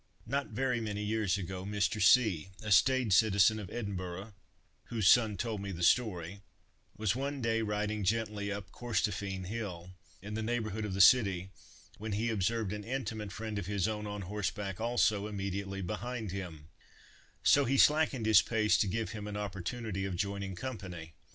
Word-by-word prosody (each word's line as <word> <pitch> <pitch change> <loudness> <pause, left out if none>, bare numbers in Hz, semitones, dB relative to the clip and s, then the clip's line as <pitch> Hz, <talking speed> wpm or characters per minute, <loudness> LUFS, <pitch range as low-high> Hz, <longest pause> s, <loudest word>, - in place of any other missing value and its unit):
Not 140 +4 -1
very 125 +1 -1
many 105 -2 -3
years 105 -3 0
ago, 95 -1 -5
Mr. 105 +1 -1
C——, 105 -10 +4
a 110 - -4
staid 115 +3 +4
citizen 110 +1 +4
of 100 -4 -7
Edinburgh—whose 100 +1 -5
son 110 -2 +5
told 110 -4 -3
me 100 0 -4
the 85 -1 -5
story—was 100 +1 -1
one 140 +2 -3
day 115 -2 +1
riding 105 0 -1
gently 105 0 -1
up 100 -1 -6
Corstorphine 100 -5 -2
hill, 90 -4 -5 0.3
in 105 +2 -8
the 110 - -2
neighborhood 110 -2 -2
of 95 -3 -3
the 100 - +3
city, 95 -4 +5 0.5
when 110 0 -4
he 115 +3 0
observed 110 0 0
an 105 0 -5
intimate 110 -4 -4
friend 110 0 -4
of 95 - -6
his 100 -2 0
own, 105 -1 -3
on 105 -1 -5
horseback 100 +1 -3
also, 110 -3 +2
immediately 100 -1 -4
behind 110 +2 -4
him; 85 -5 -7 0.7
so 140 -1 +5
he 135 +2 +1
slackened 150 -5 +4
his 110 -3 +7
pace 110 -2 +2
to 105 - +2
give 110 +4 -2
him 105 -2 -6
an 105 0 -4
opportunity 100 +1 -4
of 95 -2 -3
joining 100 0 -3
company. 90 -9 -7
105 Hz, 165 wpm, -32 LUFS, 95-110 Hz, 0.7 s, his